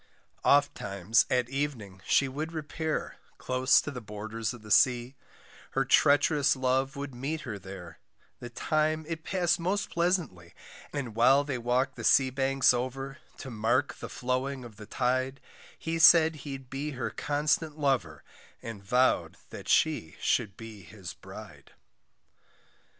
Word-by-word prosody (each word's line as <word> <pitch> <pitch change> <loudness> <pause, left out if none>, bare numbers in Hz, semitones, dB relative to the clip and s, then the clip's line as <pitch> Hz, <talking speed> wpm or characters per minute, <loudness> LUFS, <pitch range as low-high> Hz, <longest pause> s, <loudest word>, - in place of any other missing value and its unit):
Ofttimes 110 -8 +2
at 125 -1 +1
evening 125 -9 -4
she 140 - +3
would 155 +5 -5
repair, 155 0 -3 0.2
Close 130 +1 +3
to 145 - -6
the 125 -3 -7
borders 110 +1 -5
of 120 -3 -11
the 105 - -10
sea, 125 +1 +4 0.6
Her - - +1
treach'rous 145 0 +4
love 130 +2 0
would 140 -1 -6
meet 140 +6 -4
her 110 -6 -6
there, 95 -3 -10 0.4
The 120 - -8
time 155 +5 0
it 160 -1 -5
passed 175 -2 +1
most 190 +4 -1
pleasantly, 170 - -1 0.4
And 135 -6 -4
while 135 +5 +5
they 140 -4 -3
walked 125 +3 0
the - - -6
sea 130 -1 +4
banks 135 0 +3
over, 135 +3 -4 0.2
To 135 - -8
mark 120 +5 +1
the - - -7
flowing 130 +1 -2
of 110 -4 -12
the 105 -1 -11
tide, 130 +3 -1 0.4
He 165 0 -3
said 160 -1 +7
he'd 135 -3 -8
be 145 +2 -4
her 130 - -3
constant 150 +1 -1
lover 140 -4 -1 0.4
And 110 -4 -8
vow'd 125 +6 +2
that - - -9
she 150 - +2
should 95 -3 0
be 110 -2 -10
his 95 -1 -9
bride. - - -12
130 Hz, 145 wpm, -29 LUFS, 115-145 Hz, 0.6 s, said